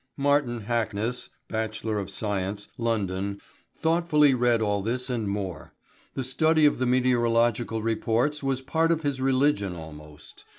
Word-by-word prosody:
Martin 140 -4 +1
Hackness, 115 +1 -2 0.2
B.Sc., 105 -2 -3
London, 100 -4 -1 0.4
thoughtfully 160 -3 +3
read 120 -2 +2
all 105 -2 0
this 125 +5 -2
and 115 -4 -2
more. 95 -5 -5 0.4
The 135 - -2
study 155 +5 +3
of 145 - +3
the 130 - +1
meteorological 120 -2 +2
reports 115 +6 0
was 135 -1 -1
part 165 +4 +1
of 165 -1 0
his 140 -2 -1
religion 130 -8 +2
almost. 75 -2 -12
115 Hz, 125 wpm, -26 LUFS, 105-135 Hz, 0.4 s, thoughtfully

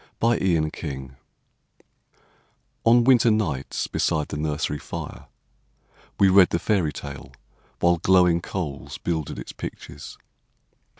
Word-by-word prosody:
A 115 +1 +3
Fairy 85 -6 +1
Tale 65 -4 -6 1.7
On 120 +1 +6
winter 120 -2 +5
nights 85 -12 -1
beside 75 -2 -1
the - - -4
nursery 75 -1 -2
fire - - -7 0.9
We 100 - +6
read 95 -1 +6
the - - 0
fairy 90 -5 +1
tale, 70 -2 -8 0.5
while 85 0 +4
glowing 90 -1 +4
coals 80 -7 -5
Builded 80 -4 -3
its - - -7
pictures. 75 -1 -9
85 Hz, 115 wpm, -24 LUFS, 75-95 Hz, 1.7 s, On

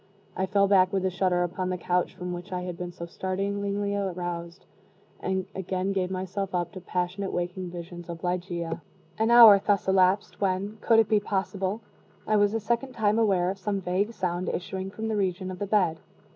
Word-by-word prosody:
I 190 - -1
fell 200 0 +3
back 185 -2 +5
with 190 -1 0
a 190 - +1
shudder 180 -1 +1
upon 185 +1 -2
the 185 - -1
couch 180 +1 0
from 180 -1 -5
which 175 +3 -7
I 180 -1 -2
had 180 -1 -5
been 175 0 -5
so 170 -1 -7
startlingly 200 +3 -2
aroused, 175 -2 -4 0.5
and 190 -1 -1
again 190 0 -2
gave 190 -2 0
myself 190 +1 -3
up 175 -1 -1
to 185 - -9
passionate 180 +2 -2
waking 175 +1 -3
visions 175 0 -8
of 170 0 -7
Ligeia. 175 -2 -2 0.4
An 220 +1 +2
hour 230 -4 +9
thus 200 -2 +1
elapsed, 190 +2 +2
when 195 +2 -1
(could 225 - +4
it 225 -2 +5
be 215 - +3
possible?) 195 +1 -2 0.4
I 215 - +2
was 205 +1 +3
a - - +1
second 235 +5 -1
time 215 -1 +2
aware 190 -5 +2
of 195 - -8
some 200 0 -1
vague 190 +4 0
sound 180 -2 -2
issuing 190 +1 -4
from 220 +3 -5
the 220 - -1
region 185 -2 -1
of 180 - -8
the 205 - -2
bed. 185 -6 +2
190 Hz, 200 wpm, -27 LUFS, 180-200 Hz, 0.5 s, hour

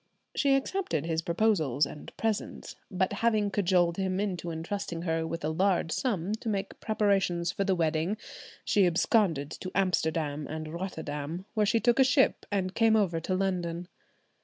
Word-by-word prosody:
She 275 -2 +3
accepted 270 - -1
his 165 -1 0
proposals 165 - +2
and 150 - -9
presents; 225 -2 -3
but 190 +1 0
having 215 -1 +1
cajoled 180 -3 +2
him 190 -1 -1
into 185 -4 -2
entrusting 165 +1 -4
her 165 -1 -1
with 165 -1 -4
a - - +1
large 175 0 +1
sum 200 - -1
to 225 - -4
make 195 -2 -3
preparations 195 -5 +1
for 195 +2 -2
the 190 -1 +2
wedding, 165 +4 0 0.5
she 200 -3 +4
absconded 170 - +2
to 185 - -6
Amsterdam 160 -6 0
and 155 0 -6
Rotterdam, 165 -1 -5
where 210 -2 +2
she 230 +2 +3
took 240 +3 +4
ship 265 +1 +2
and 190 -2 -1
came 225 0 +4
over 185 -6 +2
to 185 +3 -2
London. 180 -2 -2
185 Hz, 160 wpm, -29 LUFS, 165-205 Hz, 0.5 s, she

